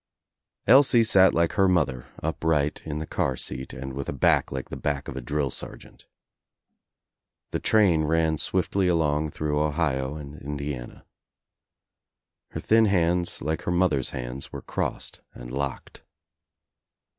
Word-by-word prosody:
Elsie 130 -2 +6
sat 95 -4 +5
like 85 0 +1
her 95 - +3
mother, 70 -9 0 0.2
ujft 80 0 0
ight 75 +1 -2
in 75 -1 -3
the 80 - -4
car 80 -6 -1
seat 65 +1 -5
and 65 +1 -7
with 70 +1 -5
a - - -2
back 70 - +2
like 65 -1 -5
the - - -5
back 70 -2 -3
of 65 - -6
a 65 - -4
drill 70 +1 -1
sergeant. - - -7 1.4
The - - -1
train 95 -8 +3
ran 80 0 +1
swiftly 95 0 +1
along 80 -3 +1
through 75 0 -1
Ohio 75 -3 -1
and 75 -1 -9
Indiana. 70 -3 -6 1.4
Her - - -6
thin 115 0 +4
hands 90 -3 +1
like 80 +2 -2
her - - -2
mother's 85 -7 +1
hands 65 +2 -6
were - - -7
crossed - - -4
and - - -9
locked. 70 -1 -5
75 Hz, 145 wpm, -25 LUFS, 70-85 Hz, 1.4 s, Elsie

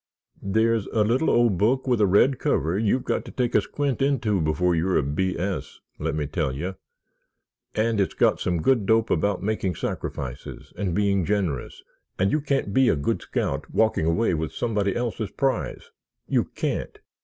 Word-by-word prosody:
"There's 110 +2 +1
a 110 - +1
little 125 +9 +2
old 115 -7 +3
book 125 +6 +2
with 125 -4 +1
a 105 - +5
red 120 +8 +4
cover 80 +5 0
you've 110 +5 +1
got - - -1
to - - -9
take 125 -2 -1
a - - +5
squint 140 -4 -2
into 120 -9 +1
before 85 +3 +1
you're 85 +3 +1
a - - +2
B. 85 +7 -1
S., 95 +2 -4 0.2
let - - -2
me 75 -1 -1
tell 75 -1 -1
you. 85 +9 -4 1.0
And 110 -1 +1
it's 95 - -1
got - - +3
some 85 -3 -1
good 120 -7 +2
dope 110 0 +3
about 100 +3 +1
making 100 -4 -1
sacrifices 65 -3 -5
and 95 -5 -2
being 100 -2 +2
generous 90 -9 -2 0.3
and 95 +2 +2
you 155 - +1
can't 135 -8 -1
be 130 +1 +4
a - - +3
good 70 0 -1
scout - - -3
walking 110 -8 +2
away 90 +5 +2
with 80 -1 -2
somebody 105 -4 -1
else's 115 -3 -2
prize—you 130 - -3
can't! - - -3
100 Hz, 180 wpm, -25 LUFS, 85-115 Hz, 1.0 s, a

